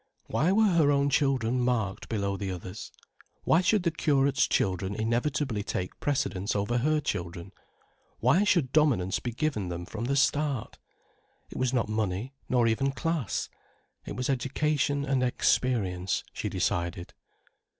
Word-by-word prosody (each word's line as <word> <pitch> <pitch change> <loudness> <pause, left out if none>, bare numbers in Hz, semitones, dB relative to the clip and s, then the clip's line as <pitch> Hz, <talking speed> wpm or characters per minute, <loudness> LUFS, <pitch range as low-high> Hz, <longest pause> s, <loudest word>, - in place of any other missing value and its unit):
Why 160 +6 +1
were 220 +3 +4
her 165 -5 +4
own 140 0 +2
children 130 -4 +1
marked 120 -6 -1
below 100 -3 -1
the 100 -1 -4
others? 90 0 -7 0.5
Why 165 - +4
should 200 +1 +2
the 170 - +1
curate's 140 -3 +2
children 95 +1 0
inevitably 120 +1 -1
take 90 -2 -4
precedence 100 -8 -1
over 105 +4 0
her 155 +5 +2
children, 85 - -4 0.7
why 140 - +4
should 170 -11 +2
dominance 130 -12 +2
be 120 - -4
given 120 - -2
them 85 0 -5
from 110 +5 -5
the 140 +3 0
start? 140 -2 0 0.7
It - - -6
was 130 -1 +1
not 125 -4 +1
money, 110 +3 -2 0.2
nor 125 -2 +3
even 125 +5 +1
class. 160 - -2 0.6
It - - -7
was 125 - -2
education 140 +2 0
and 135 -2 +1
experience, 105 -7 +1
she - - -3
decided. 85 0 -2
125 Hz, 145 wpm, -28 LUFS, 100-145 Hz, 0.7 s, were